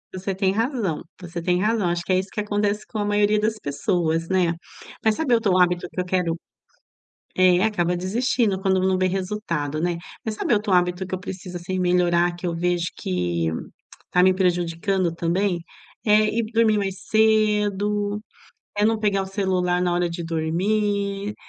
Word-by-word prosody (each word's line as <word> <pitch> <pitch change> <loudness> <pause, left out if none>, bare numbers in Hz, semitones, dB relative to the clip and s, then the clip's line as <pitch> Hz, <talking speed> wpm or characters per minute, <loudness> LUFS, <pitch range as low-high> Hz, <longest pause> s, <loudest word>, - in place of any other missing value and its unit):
Você 190 +1 -3
tem 190 0 +1
razão, 225 - -1 0.2
você 175 -1 -6
tem 180 +1 +1
razão. 215 -3 +1
Acho 170 0 -1
que 185 - 0
é 185 - +4
isso 190 +1 -5
que - - -4
acontece 205 0 -1
com 220 - -5
a 205 - 0
maioria 205 0 +2
das 215 +1 0
pessoas, 165 +1 -1
né. 180 -3 +2 0.5
Mas, 220 -1 +3
sabe 270 -3 0
outro 210 -5 +3
hábito 180 -1 +2
que - - -6
eu - - -4
quero 180 -2 0 1.0
é, 185 -1 +5
acaba 180 -5 +1
desistindo 205 +2 0
quando 190 -1 +2
não 190 0 +2
vê 185 - +2
resultado, 180 -6 -2
né. 175 +1 0 0.3
Mas, 220 - -2
sabe 215 - -1
outro 210 -1 0
hábito 180 +1 +2
que 185 - -4
eu 185 - -4
preciso 185 -1 -7
assim 185 +2 -4
melhorar, 175 -1 +2
que 175 - -5
eu 170 - -1
vejo 175 0 0
que 85 -2 -1 0.6
tá 180 - +4
me 185 0 +5
prejudicando 180 0 0
também? 175 +2 0 0.4
É 215 0 +5
ir 225 +2 0
dormir 225 -2 +3
mais 195 -2 -2
cedo, 210 -1 +2 0.6
é 205 - +2
não 225 +1 +2
pegar 205 -2 +1
o - - -5
celular 185 -2 0
na 175 -1 +1
hora 175 0 +1
de 170 0 -5
dormir. 200 +5 -1
190 Hz, 180 wpm, -23 LUFS, 175-210 Hz, 1.0 s, é